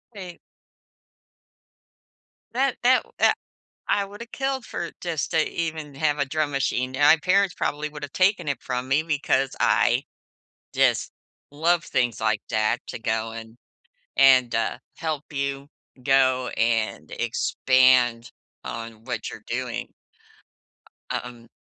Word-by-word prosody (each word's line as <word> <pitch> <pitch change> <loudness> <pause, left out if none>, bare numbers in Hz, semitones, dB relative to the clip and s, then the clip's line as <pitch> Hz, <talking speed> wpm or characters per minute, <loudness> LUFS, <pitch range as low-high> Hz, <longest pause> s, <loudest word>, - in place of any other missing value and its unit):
Wait 180 -3 -8 2.1
That 260 +2 +1
that 255 +1 +4
that - - +4 0.5
I 200 - +1
woulda 205 +4 -10
killed 270 0 -3
for 170 -1 -5
just 165 -5 -2
to 160 -1 +3
even 160 -3 -4
have 150 +1 0
a 145 - +2
drum 150 +2 -1
machine, 130 -2 -1
and 145 - 0
my 145 +3 +7
parents 185 +4 +2
probably 150 +1 -2
would 150 -1 -9
have 145 - -7
taken 190 -2 +2
it 140 - -2
from 125 0 -3
me 145 +4 +2
because 145 -3 0
I 120 +4 +3 0.7
just - - +2 0.4
love 165 +4 +1
things 120 -4 0
like 110 -1 +1
that 110 0 0
to - - -6
go 110 0 -1
and 115 0 -9 0.6
and, 130 -3 +6
uh, 115 0 0 0.2
help 155 -2 -4
you 140 0 -3 0.3
go 130 -1 +3
and 110 -9 0
expand 120 0 +2 0.3
on 115 -1 -7
what 125 - -4
you're - - -11
doing. - - -4 1.2
Uh - - 0
um, 120 -1 -11
140 Hz, 135 wpm, -24 LUFS, 120-160 Hz, 2.1 s, my